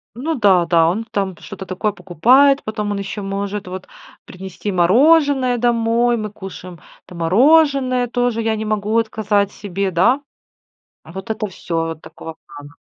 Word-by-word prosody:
Ну 315 +7 -3
да, 195 - +3
да, 165 -1 +3
он 220 +6 -3
там 195 -4 -3
что-то 195 -2 -9
такое 190 +3 -2
покупает, 255 - +3
потом 215 -1 -4
он 200 - -3
ещё 200 +1 -6
может 200 0 -4
вот, 185 0 -8 0.4
принести 190 +2 -7
мороженое 260 - +3
домой, 235 0 +1
мы 215 -1 -4
кушаем, 185 -4 -10 0.3
там 180 - -12
мороженое 255 - +3
тоже, 245 -1 -1
я 220 -1 0
не 215 - -4
могу 215 0 -2
отказать 210 -2 0
себе, 195 -1 -4
да? 190 - +2 0.8
А 160 - -14
вот 190 +2 -8
это 215 -1 -2
всё, 175 -3 -6
вот 165 -1 -7
такого 160 0 -10
плана. 145 0 -13
210 Hz, 160 wpm, -18 LUFS, 185-240 Hz, 0.8 s, да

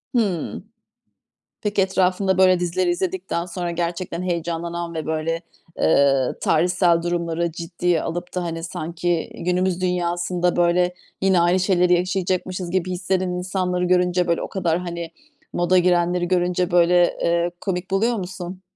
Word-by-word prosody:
Hıı. 190 -8 -1 1.0
Peki, 205 -2 +1
etrafında 190 0 +1
böyle 185 -1 +5
dizileri 180 +1 0
izledikten 180 -1 -2
sonra, 175 -1 -4
gerçekten 170 +1 -3
heyecanlanan 170 0 -3
ve 160 -1 -4
böyle, 160 +1 -2 0.4
eee, 140 -3 +4 0.2
tarihsel 175 +1 +3
durumları 170 -1 -1
ciddiye 170 0 -1
alıp 175 +2 -5
da 180 - -1
hani, 165 -1 -4
sanki 170 0 -2
günümüz 180 +1 0
dünyasında 175 0 0
böyle 175 +1 +2 0.3
yine 190 -2 +4
aynı 175 +2 +3
şeyleri 180 -1 +3
yaşayacakmışız 180 0 -1
gibi 185 -1 0
hislenen 185 0 -1
insanları 180 0 -1
görünce, 180 0 +2
böyle 170 -1 +1
o - - -3
kadar 175 -3 0
hani, 170 -2 -5 0.4
moda 175 +1 +2
girenleri 175 0 +2
görünce, 180 0 +1
böyle, 175 0 +4
eee, 170 +1 +1
komik 185 -1 -3
buluyor 225 +5 +2
musun? 185 0 -6
175 Hz, 135 wpm, -22 LUFS, 170-185 Hz, 1.0 s, böyle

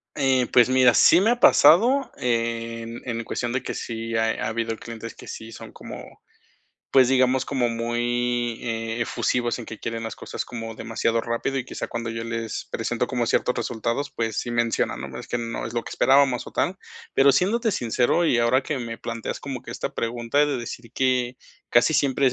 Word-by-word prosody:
Eh, 130 -3 +2
pues, 125 -1 +6
mira, 130 -1 +5
sí 170 - +6
me 210 - +3
ha 240 - 0
pasado 245 - +6
en 115 -1 -2
en 115 -2 -3
cuestión 120 +1 -3
de 125 - 0
que - - -5
sí 115 0 -4
ha 110 0 0
habido 115 0 -2
clientes 115 -1 -8
que - - -13
sí 115 0 -8
son - - -10
como, - - -11 0.7
pues, 130 -2 +5
digamos, 130 0 +3
como 130 -4 0
muy 120 0 -1 0.4
efusivos 120 +1 0
en 120 - -8
que 115 - -8
quieren 115 0 -4
las 115 - -5
cosas - - -6
como 115 -2 -6
demasiado 115 +1 -1
rápido, 115 +4 -2
y 130 - -3
quizá - - -5
cuando 115 0 -4
yo 115 0 -4
les 115 -1 -4
presento 120 +2 -1
como 120 -2 -1
ciertos 125 - +1
resultados, 120 +3 -2
pues, 115 -2 -2
sí 120 - -3
mencionan, 120 -1 0
¿no? 65 - -8
Es - - -9
que - - -1
no 115 -1 -4
es 115 - -8
lo 120 - 0
que - - -8
esperábamos 135 -2 +3
o - - -8
tal. 185 - 0 0.4
Pero 140 +1 +5
siéndote 220 - +2
sincero, 125 - +1
y 125 -7 +3
ahora 120 +3 +3
que 140 +1 -3
me 115 -2 -5
planteas 115 -1 -5
como 135 -3 -5
que - - -10
esta - - -4
pregunta 115 +3 -2
de 145 -2 -1
decir 115 -1 -7
que 130 -1 +1 0.3
casi 120 +6 +4
siempre 140 -2 +2
es 130 - +3
120 Hz, 195 wpm, -24 LUFS, 115-130 Hz, 0.7 s, pues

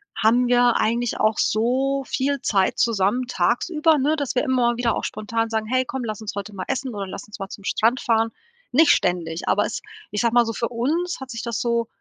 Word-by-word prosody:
haben 230 +5 +3
wir 245 -1 +4
eigentlich 235 +2 0
auch 215 -1 +2
so 265 +5 +1
viel 280 0 -1
Zeit 195 -3 +1
zusammen, 230 +2 +1
tagsüber, 300 - +2
ne, 290 +3 +2
dass 285 -4 -3
wir - - +2
immer 245 -2 +1
wieder 235 -1 +1
auch - - -3
spontan 225 +1 -2
sagen: 220 -1 -1
„Hey 255 +2 +1
komm, 265 0 -4
lass 215 -1 -5
uns 215 - -5
heute 200 +1 -5
mal 185 - -5
essen 265 -2 -2
oder 195 -1 -4
lass - - -7
uns 210 - -11
mal 195 0 -5
zum 200 - -10
Strand 235 +5 +2
fahren.“ 225 -1 +1 0.4
Nicht 295 +3 +5
ständig, 170 -2 0
aber - - +3
es - - -4 0.3
ich 210 - -1
sage 235 -1 +1
mal 240 -1 +6
so, 230 - -3
für 235 +1 -2
uns 310 +10 -1
hat 265 -1 -8
sich 230 - -5
das 235 -2 -3
so 235 -1 0
235 Hz, 225 wpm, -23 LUFS, 215-255 Hz, 0.4 s, mal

